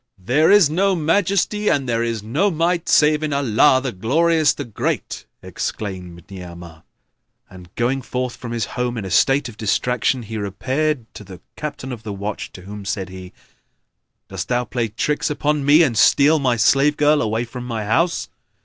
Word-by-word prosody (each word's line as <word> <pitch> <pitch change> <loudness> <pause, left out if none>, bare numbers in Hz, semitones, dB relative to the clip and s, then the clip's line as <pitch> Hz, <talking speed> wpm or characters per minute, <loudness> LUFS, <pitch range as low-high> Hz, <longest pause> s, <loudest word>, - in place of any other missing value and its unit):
"There 130 - +2
is 205 -5 +6
no 190 +5 +1
Majesty 200 +5 +1
and 135 -2 0
there 115 -1 0
is 115 -3 -2
no 145 - +1
Might 170 0 -1
save 150 0 +4
in 155 -1 -2
Allah, 135 -1 +3
the 130 - -2
Glorious, 155 - +2
the 145 - -5
Great!" 115 - -4 0.2
exclaimed 90 -5 -6
Ni'amah 85 -3 -10 0.7
and, 90 -1 -13
going 125 +3 0
forth 125 0 -4
from 120 - -8
his 115 -1 -2
home 125 -1 -2
in 105 - -4
a 95 - -6
state 135 - +3
of 115 -3 -11
distraction, 125 +3 0
he 110 0 -6
repaired 130 +7 -2
to - - -10
the 95 -3 -12 0.2
Captain 145 -3 -6
of 120 -3 -7
the 110 -2 -6
Watch 100 +2 -5
to 90 - -12
whom 100 +1 -9
said 95 -1 -4
he, 95 -1 -10 1.0
"Doss - - -5
thou 125 0 -1
play 120 0 -2
tricks 130 +7 -1
upon 150 0 -1
me 150 +4 +6
and 130 -7 0
steal 150 +7 +4
my 130 -4 +1
slave 140 +6 +3
girl 150 0 +3
away 110 +1 -1
from 120 +1 -8
my 115 -3 -4
house? 165 +11 0
125 Hz, 180 wpm, -20 LUFS, 105-150 Hz, 1.0 s, is